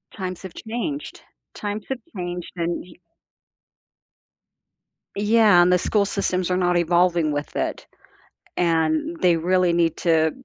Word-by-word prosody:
Times 185 -3 -5
have 190 - -8
changed, 245 +7 -5 0.3
times 205 0 -5
have 265 - -3 0.2
changed 175 -1 -5
and 170 0 -2
y 180 - -14 2.2
Yeah, 210 -2 +5
and 180 +1 +4
the 180 - +5
school 200 +3 +1
systems 185 -2 -1
are 180 - +2
not 180 -1 +2
evolving 170 -1 +2
with 145 0 -4
it, - - -3 0.7
and 165 -1 +1
they 175 -2 +4
really 180 +1 +2
need 170 -1 +1
to 160 -2 +2
180 Hz, 130 wpm, -23 LUFS, 170-200 Hz, 2.2 s, Yeah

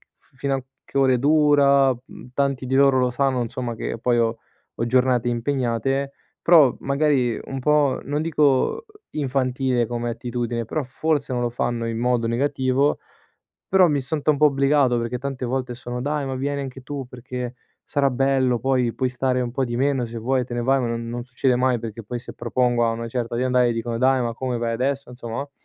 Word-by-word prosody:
f - - -27
fino 135 +1 0
a 135 - -4 0.2
che - - -5
ore 130 -2 +4
dura?" 140 -2 +4
Mhmm, 125 0 -13
tanti 140 -1 0
di 130 - -3
loro 135 -1 +5
lo 125 -1 +2
sanno 130 -1 +1
insomma 120 0 -4
che 115 - -4
poi 120 +1 +2
ho 115 -1 +1 0.4
ho 115 - -1
giornate 125 -1 +2
impegnate, 130 +2 -1 0.3
però 155 -7 +6
magari, 140 -4 +1
un 135 - -5
po' 150 0 +2
non 145 +2 -2
dico, 155 - +2 0.3
infantile 130 -3 0
come 120 0 -3
attitudine, 120 0 -3
però 150 +7 -2
forse 140 +2 -1
non 125 -1 -1
lo 120 - 0
fanno 120 -1 -2
in 115 0 -3
modo 120 -1 +1
negativo, 130 +3 +1 0.7
però 190 -1 +6
mi 145 -3 +1
sento 150 +3 -2
un 145 - -1
po' 150 +1 +6
obbligato 140 -2 +2
perché 115 +1 -2
tante 135 -1 -4
volte 125 0 -2
sono: 125 0 -5
"Dai 145 +1 -1
ma 135 -1 -3
vieni 140 +2 -2
anche 130 -1 -7
tu, 140 -1 -6
perché 125 0 -6 0.3
sarà 140 -1 +1
bello, 130 -1 +2
poi 125 -1 +1
puoi 130 - 0
stare 125 0 0
un 120 -1 -3
po' 135 +2 -1
di 120 -1 -3
meno, 135 -1 +1
se 115 0 -7
vuoi 125 +3 0
te 120 - -8
ne 120 - -1
vai." 135 +2 +3
Ma 120 - -1
non 115 0 -3
non 120 +1 -4
succede 125 +1 0
mai 125 -1 +2
perché 115 0 -7
poi, 120 +4 -5
se 120 - -10
propongo 120 0 +1
a - - +2
una 115 +1 -4
certa 120 0 -3
di 125 - 0
andare 125 -1 +3
dicono: 115 0 -3
"Dai 130 +1 +3
ma 120 -1 -2
come, 125 +1 -3
vai 115 0 -1
adesso?" 135 +3 -1
Insomma, 120 -2 -7
no, 140 +1 -5
130 Hz, 205 wpm, -23 LUFS, 120-140 Hz, 0.7 s, però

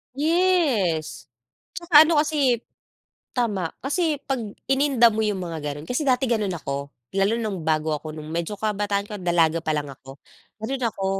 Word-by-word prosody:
Yes! 295 - +1 0.5
Tsaka 315 -2 +7
ano 310 -3 +4
kasi 290 -5 +2
eh - - -9 0.8
tama, 205 -9 0 0.2
kasi 310 0 0
'pag 265 -3 -1 0.3
ininda 265 -4 +4
mo 220 - -1
yung 210 -3 -1
mga 165 -2 -5
ganun 145 +2 -9
kasi 250 +5 -1
dati 260 0 +3
ganun 210 -5 0
ako. 140 -2 -5 0.3
Lalo 200 +4 +3
nung 200 -8 -4
bago 155 0 +1
ako 155 +1 -6
nung 155 0 -8
medyo 170 +5 -2
kabataan 205 -1 -1
ko, 210 -1 -7
dalaga 170 -2 +2
pa 155 -1 -1
lang 145 -1 -3
ako, 135 0 -12 0.5
ganun 260 +3 -3
ako. 195 -3 -3
210 Hz, 165 wpm, -24 LUFS, 165-270 Hz, 0.8 s, Tsaka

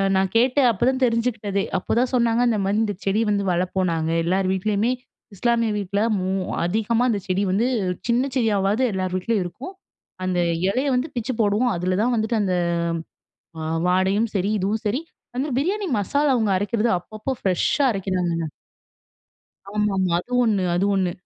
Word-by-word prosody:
நான் 190 0 +1
கேட்டு 255 +4 +3
அப்போதான் 260 +5 0
தெரிஞ்சுக்கிட்டதே. 230 -4 0
அப்போதான் 245 +7 0
சொன்னாங்க, 235 -1 +2
இந்த 220 - +1
மாதிரி 200 +3 +1
இந்த 205 - -2
செடி 200 +3 +2
வந்து 200 -1 +1
வளர்ப்போம். 185 +1 0
நாங்க 160 -1 -1
எல்லார் 185 +2 +1
வீட்லயுமே 210 +4 0 0.4
இஸ்லாமிய 230 +1 +1
வீட்டுல 200 0 -2 0.2
மோ 185 0 -2 0.4
அதிகமா 225 +5 +1
அந்த 210 -3 0
செடி 190 +2 +1
வந்து, 215 +6 +2 0.4
சின்ன 240 +2 +2
செடியாவாவது 210 -1 +1
எல்லார் 185 -1 -2
வீட்லயும் 200 +2 0
இருக்கும். 265 - -8 0.5
அந்த 185 -1 0 0.3
இலைய 260 +7 0
வந்து 250 +4 0
பிச்சு 240 +1 -2
போடுவோம். 215 +4 +2
அதுல 180 +1 -1
தான் 245 +3 +2
வந்துட்டு 220 +1 0
அந்த 185 -3 0 1.3
வாடையும் 190 +5 +2
சரி, 195 0 0
இதுவும் 205 +3 -1
சரி 230 +7 0 0.4
அந்த 275 +4 -1
பிரியாணி 385 +9 0
மசாலா 280 +8 +1
அவங்க 220 -3 +1
அரைக்கிறது 215 +4 0
அப்பப்போ 215 +7 -7
ஃப்ரெஷ்ஷா 190 - +1
அரைக்கிறாங்கங்க. 180 -5 -1 1.3
ஆமாமா. 195 -4 0
அது 245 - -11
ஒண்ணு 210 -5 +1
அது 185 +3 +1
ஒண்ணு. 185 -2 +1
205 Hz, 150 wpm, -23 LUFS, 190-235 Hz, 1.3 s, கேட்டு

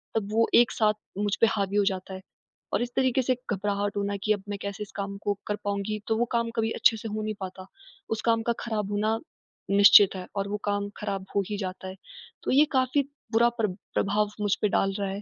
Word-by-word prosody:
तब 210 -2 -1
वो 225 +1 +3
एक 240 -1 +6
साथ 215 -1 +2 0.2
मुझ 205 0 0
पे 230 - +7
हावी 200 -1 -1
हो 205 - +4
जाता 190 -1 -2
है। 190 - -7 0.5
और - - +2
इस 240 0 -2
तरीके 260 0 +2
से 255 0 +1 0.2
घबराहट 205 0 -1
होना 200 0 -1
कि 215 - +1
अब 205 -2 -5
मैं 205 - -3
कैसे 200 +1 -4
इस 205 - -12
काम 200 0 -4
को 205 - +1
कर 210 - 0
पाऊँगी। 205 +1 -2
तो 225 - +2
वो 240 - +2
काम 235 -1 +1
कभी 225 0 0
अच्छे 225 - +3
से 220 - -6
हो 215 0 -3
नहीं 215 0 -2
पाता। 185 -1 -7 0.4
उस 220 -1 -2
काम 230 -1 +3
का - - +3
ख़राब 210 -3 -3
होना 215 +2 0 0.5
निश्चित 200 0 +8
है, 185 -1 -5
और 200 0 -1
वो 210 - -2
काम 205 0 -1
ख़राब 195 -2 -4
हो 200 - +4
ही 210 - -2
जाता 190 -1 -5
है। 185 - -7 0.5
तो - - -1
ये 285 +3 +6
काफ़ी 260 +1 +2 0.3
बुरा 235 +2 +4
प्रा 230 -2 -1 0.3
प्रभाव 210 +1 +1
मुझ 205 -1 +2
पे 210 - +3
डाल 195 0 +2
रहा 200 -1 -1
है। 195 +1 -5
205 Hz, 235 wpm, -27 LUFS, 200-225 Hz, 0.5 s, निश्चित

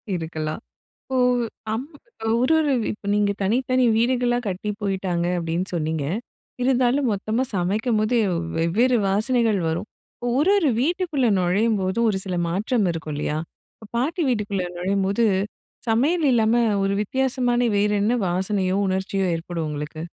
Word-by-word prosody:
இருக்கலாம். 160 0 -4 0.4
இப்போ 260 - -4 0.6
அம் 255 +6 -4 0.5
ஒரு, 260 +6 +3
ஒரு 300 -3 +2 0.2
இப்ப 210 - -11
நீங்க 205 -1 +2
தனித்தனி 255 +5 +2
வீடுகளா 245 0 +2
கட்டி 195 +3 -3
போயிட்டாங்க 185 -3 -1
அப்பிடின்னு 170 +2 -2
சொன்னீங்க. 160 -2 -1 0.6
இருந்தாலும் 255 +1 +2
மொத்தமா 215 +4 -1
சமைக்கும் 210 +6 0
போது 215 +3 +1 0.4
வெவ்வேறு 220 +10 +2
வாசனைகள் 220 +1 +2
வரும். 160 +6 -3 0.3
இப்போ 245 - -4
ஒரு, 335 +8 +4
ஒரு 325 -7 +2
வீட்டுக்குள்ள 315 -3 +1
நுழையும்போதும் 200 +3 +1
ஒரு 195 - -1
சில 185 -2 -3
மாற்றம் 205 +5 0
இருக்கும் 160 -2 -5
இல்லயா! 150 +1 -2 0.4
இப்ப 220 - -14
பாட்டி 310 +9 0
வீட்டுக்குள்ள 205 -6 -1
நுழையும்போது 195 +4 0 0.6
சமையல் 295 +9 +2
இல்லாம 225 -1 +3 0.3
ஒரு 195 0 +1
வித்தியாசமான 250 +1 0 0.2
வேற 205 +1 +2
என்ன 220 +4 +2
வாசனையோ, 185 +1 0
உணர்ச்சியோ 190 +1 -1
ஏற்படும் 165 -1 -4
உங்களுக்கு? 150 +1 -5
210 Hz, 130 wpm, -23 LUFS, 185-245 Hz, 0.6 s, ஒரு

